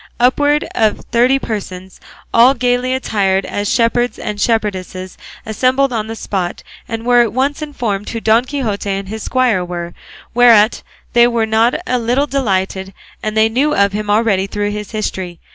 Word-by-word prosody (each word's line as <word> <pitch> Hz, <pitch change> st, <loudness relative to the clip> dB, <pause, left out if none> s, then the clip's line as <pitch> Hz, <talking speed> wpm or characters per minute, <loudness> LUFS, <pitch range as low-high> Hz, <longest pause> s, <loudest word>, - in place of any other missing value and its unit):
Upwards 290 Hz, +4 st, +2 dB
of 220 Hz, -2 st, 0 dB
thirty 245 Hz, +3 st, +3 dB
persons, 190 Hz, -6 st, -6 dB, 0.3 s
all 245 Hz, +4 st, +6 dB
gaily 250 Hz, +1 st, 0 dB
attired 195 Hz, -6 st, 0 dB
as 205 Hz, 0 st, -2 dB
shepherds 240 Hz, +1 st, +1 dB
and 210 Hz, -1 st, -5 dB
shepherdesses, 190 Hz, -5 st, -2 dB, 0.3 s
assembled 255 Hz, +4 st, +1 dB
on 220 Hz, -2 st, -2 dB
the 225 Hz, -, -5 dB
spot, 185 Hz, -5 st, -4 dB, 0.2 s
and 225 Hz, -1 st, -5 dB
were 245 Hz, 0 st, +5 dB
at 225 Hz, -3 st, 0 dB
once 275 Hz, +4 st, 0 dB
informed 235 Hz, -9 st, -3 dB
who 230 Hz, -, -4 dB
Don 225 Hz, +2 st, +3 dB
Quixote 230 Hz, -8 st, -3 dB
and 195 Hz, 0 st, -3 dB
his 220 Hz, +1 st, -5 dB
squire 245 Hz, -8 st, +1 dB
were, 175 Hz, -1 st, -6 dB, 0.4 s
whereat 230 Hz, -2 st, +5 dB, 0.3 s
they 240 Hz, 0 st, +6 dB
were 235 Hz, -2 st, 0 dB
not 220 Hz, +2 st, +2 dB
a 250 Hz, -, 0 dB
little 245 Hz, +5 st, +1 dB
delighted, 195 Hz, -8 st, -2 dB, 0.3 s
as 215 Hz, -, -3 dB
they 220 Hz, 0 st, +4 dB
knew 275 Hz, +7 st, +1 dB
of 200 Hz, 0 st, +2 dB
him 210 Hz, 0 st, -3 dB
already 205 Hz, -3 st, +2 dB
through 205 Hz, +1 st, -2 dB
his 210 Hz, -1 st, -6 dB
history. 190 Hz, -5 st, -4 dB
225 Hz, 165 wpm, -16 LUFS, 200-245 Hz, 0.4 s, all